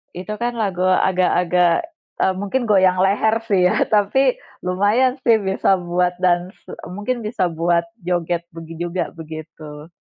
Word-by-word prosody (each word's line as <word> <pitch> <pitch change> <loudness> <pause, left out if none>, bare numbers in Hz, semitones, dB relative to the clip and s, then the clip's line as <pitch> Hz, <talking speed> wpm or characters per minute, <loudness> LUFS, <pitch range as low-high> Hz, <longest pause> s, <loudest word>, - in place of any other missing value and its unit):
itu 185 +4 -5
kan 240 0 -1
lagu 185 -3 -1 0.2
agak-agak, 180 -1 +2 0.5
eee, 190 - +3
mungkin 205 +6 -1
goyang 185 -2 +4
leher 220 +3 +2
sih 195 -4 +2
ya - - 0 0.2
tapi 205 +5 +3 0.5
lumayan 205 +8 +2
sih 230 -2 +5
bisa 190 - 0 0.2
buat 180 0 +1
dans 175 0 +2 0.5
mungkin 240 +5 -2
bisa 215 -4 -2 0.2
buat 170 0 +2 0.2
joget 175 -1 -1
begi 165 0 -9
juga 175 +1 -2 0.2
begitu. 155 0 -10
180 Hz, 135 wpm, -20 LUFS, 175-205 Hz, 0.5 s, sih